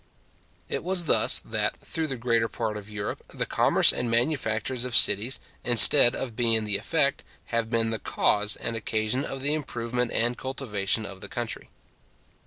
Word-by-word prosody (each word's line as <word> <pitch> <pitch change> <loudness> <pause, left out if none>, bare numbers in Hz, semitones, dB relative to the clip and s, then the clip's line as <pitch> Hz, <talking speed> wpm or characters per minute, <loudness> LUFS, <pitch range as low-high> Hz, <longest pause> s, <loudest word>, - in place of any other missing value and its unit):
It - - -4
was 180 -1 -1
thus, - - +4
that, - - -3
through 160 -1 -5
the 135 - -4
greater 115 -1 -1
part 110 -1 -5
of 105 0 -9
Europe, 105 -1 -6
the - - -3
commerce - - +3
and 120 - -3
manufactures 120 -1 -1
of 125 -2 -3
cities, 115 +7 +4 0.2
instead 120 +2 +7
of 120 -4 -5
being 115 -2 +2
the 105 -1 0
effect, 140 -4 -1 0.3
have 115 -1 -1
been 115 -1 0
the 110 - -3
cause 105 0 0
and 115 - -5
occasion 110 +3 -2
of 135 - -6
the 145 +2 +2
improvement 125 -4 -3
and 120 +2 +1
cultivation 110 -5 -3
of 100 -1 -10
the - - -8
country. - - -6
115 Hz, 170 wpm, -25 LUFS, 110-130 Hz, 0.3 s, instead